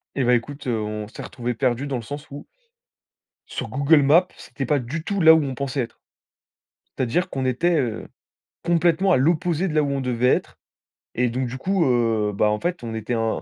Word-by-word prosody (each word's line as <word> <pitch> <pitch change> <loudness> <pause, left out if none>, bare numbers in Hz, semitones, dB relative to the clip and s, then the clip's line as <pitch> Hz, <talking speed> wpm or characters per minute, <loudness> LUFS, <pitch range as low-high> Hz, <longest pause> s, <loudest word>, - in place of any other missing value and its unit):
Et 135 - +1
bah 125 - +3
écoute, 140 +4 -2
heu, 120 -3 0
on 105 0 -4
s'est 110 - -10
retrouvés 120 -1 -4
perdus 125 +2 0
dans 140 - -3
le - - -5
sens 145 +7 -8
où 145 - -8 1.0
sur - - -5
Google 145 +2 +4
Maps, 165 +6 +5
c'était 135 - -6
pas 145 +3 +1
du 140 +6 -5
tout 200 +2 -2
là 160 0 +9
où 160 -1 +3
on 135 -2 -4
pensait 140 0 -2
être. 120 -1 -6 1.0
C'est-à-dire 170 +9 0
qu'on 135 -5 -3
était, 160 +7 +1
heu, 115 -5 -3 0.6
complètement 175 +2 +2
à - - +5
l'opposé 165 +5 +1
de 155 - -4
là 155 - +4
où 145 - -1
on 140 -1 -1
devait 125 -1 0
être. - - -1 0.6
Et 125 0 +1
donc 125 +2 -2
du 125 - -6
coup, 185 +3 +1
heu, 115 -4 +1
bah, 105 +2 +2
en 105 - 0
fait, 175 -2 -3
on 115 -1 -5
était 110 +2 -3
un 115 -1 -1
135 Hz, 215 wpm, -23 LUFS, 120-160 Hz, 1.0 s, là